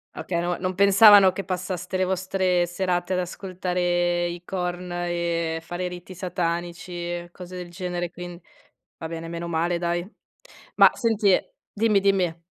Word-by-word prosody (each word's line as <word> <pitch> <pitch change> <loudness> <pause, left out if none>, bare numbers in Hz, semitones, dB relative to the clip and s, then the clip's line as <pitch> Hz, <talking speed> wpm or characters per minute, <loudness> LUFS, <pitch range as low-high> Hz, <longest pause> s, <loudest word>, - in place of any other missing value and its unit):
Okay, 170 -2 -2
no 175 0 -1
non 185 0 -2
pensavano 200 0 +8
che 195 0 -6
passaste 185 0 -4
le 185 - +2
vostre 185 -1 +1
serate 180 0 -1
ad 180 - +1
ascoltare 175 -1 -1
i 175 0 -6
Korn, 180 -1 -4
e 170 -2 -1
fare 175 +2 -4
riti 180 +1 -8
satanici 175 -1 -3
e 175 0 -4
cose 180 0 -10
del 180 -1 -7
genere; 175 -1 -4
quin 175 0 -8 0.6
va 160 - -5
bene, 165 0 -6
meno 170 0 -5
male 170 +1 0
dai. 175 0 -1 0.7
Ma - - +8
senti 220 -4 +2
e - - +1 0.2
dimmi, 210 -2 +2
dimmi. 180 -4 +1
175 Hz, 155 wpm, -24 LUFS, 175-185 Hz, 0.7 s, pensavano